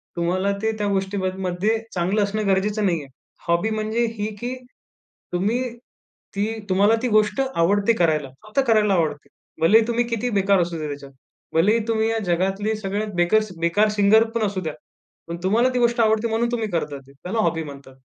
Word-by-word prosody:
तुम्हाला 185 +3 0
ते 220 0 +1
त्या 205 -1 -1
गोष्टीमध्ये 190 +1 -1
चांगलं 190 +4 +1
असणं 205 +1 -2
गरजेचं 205 +2 +1
नाहीये. 165 -6 -1 0.4
हॉबी 170 +6 +2
म्हणजे 220 +2 0
ही, 205 +1 -2
की 250 +1 -3 0.8
तुम्ही 205 +7 +1 0.8
ती 200 +1 +1 0.2
तुम्हाला 200 +4 +4
ती 255 - 0
गोष्ट 215 +5 +2
आवडते 200 +6 +3
करायला. 155 -8 +1 0.2
फक्त 215 +6 -1
करायला 210 -3 +4
आवडते. 155 -5 -1 0.3
भलेही 220 +7 +5
तुम्ही 240 0 +1
किती 235 +1 -2
बेकार 195 0 +3
असूदेत 165 -3 -3
त्याच्यात, 140 -1 -8 0.4
भलेही 205 +8 +3
तुम्ही 220 0 +1
या 225 - 0
जगातली 195 +5 0
सगळ्यात 205 +1 -3
बेकस 210 +5 +2
बेकार 205 +6 +3
सिंगर 210 +2 +5
पण 230 - 0
असू 195 -2 -2
द्या, 155 -3 -4 0.5
पण 170 0 -5
तुम्हाला 230 +7 +3
ती 250 - +1
गोष्ट 235 0 +2
आवडते 220 +1 +2
म्हणून 230 +1 0
तुम्ही 225 -2 -1
करता 150 -4 -2
ती, - - -16
त्याला 180 +11 -4
हॉबी 165 -6 +1
म्हणतात. 140 -2 -11
200 Hz, 170 wpm, -22 LUFS, 175-220 Hz, 0.8 s, भलेही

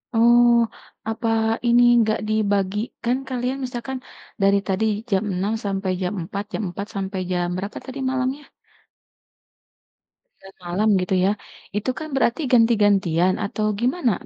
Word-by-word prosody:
Oh, 235 0 +5 0.4
apa 225 +1 -2 0.4
ini 240 +1 +5
enggak 220 -2 +2
dibagi, 205 -2 +1 0.3
kan 245 +2 +1
kalian 255 +1 -2
misalkan 250 +1 -5 0.4
dari 200 0 +4
tadi 195 +3 0 0.3
jam 195 +2 +2
6.00 195 +4 -1
sampai 195 -1 -1
jam 180 +2 -1
4.00, 200 -1 -4
jam 220 - -2
4.00 200 +3 -6
sampai 195 0 -3
jam 175 -1 0
berapa 200 +2 -5
tadi 270 +1 -7
malamnya? 265 +2 -3 1.9
9.00 195 0 -15
malam 200 +5 +1
gitu 185 +1 0
ya. - - +4 0.5
Itu 215 +5 -2
kan 310 - -5
berarti 270 +3 +1
ganti-gantian 200 -7 +3
atau 215 +1 -2
gimana? 250 0 +1
215 Hz, 135 wpm, -22 LUFS, 195-240 Hz, 1.9 s, Oh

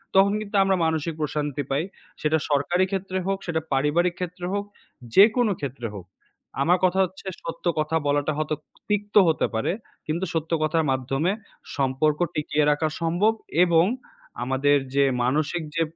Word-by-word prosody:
তখন 200 +1 +5
কিন্তু 205 0 -6
আমরা 195 0 +2
মানসিক 160 0 0
প্রশান্তি 150 -2 -2
পাই।" 140 +4 +1 0.4
সেটা 155 +1 +2
সরকারি 175 +6 +2
ক্ষেত্রে 190 -1 -2
হোক, 195 0 +1
সেটা 160 -1 0
পারিবারিক 165 +6 +2
ক্ষেত্রে 180 0 -5
হোক, 200 0 0 0.5
যেকোন 220 +4 +6
ক্ষেত্রে 130 -4 -4
হোক। 90 -3 -8 0.6
আমার 175 +5 +4
কথা 185 +1 +2
হচ্ছে 190 +2 -12 0.2
সত্য 165 +1 -7
কথা 155 +1 0
বলাটা 145 +1 +1
হয়তো 155 0 -1 0.3
তিক্ত 205 0 -1
হতে 160 - +2
পারে। 110 - 0 0.4
কিন্তু 170 +5 -1
সত্য 160 0 -2
কথার 160 +1 +2
মাধ্যমে 135 +7 0 0.5
সম্পর্ক 140 +3 +1 0.2
টিকিয়ে 150 0 +1
রাখা 155 +2 +1
সম্ভব 175 +7 +2 0.3
এবং 170 -1 +4 0.6
আমাদের 135 +3 +3 0.2
যে 140 - +5 0.2
মানসিক 155 +6 0
যে 165 - +1
160 Hz, 150 wpm, -24 LUFS, 145-180 Hz, 0.6 s, যেকোন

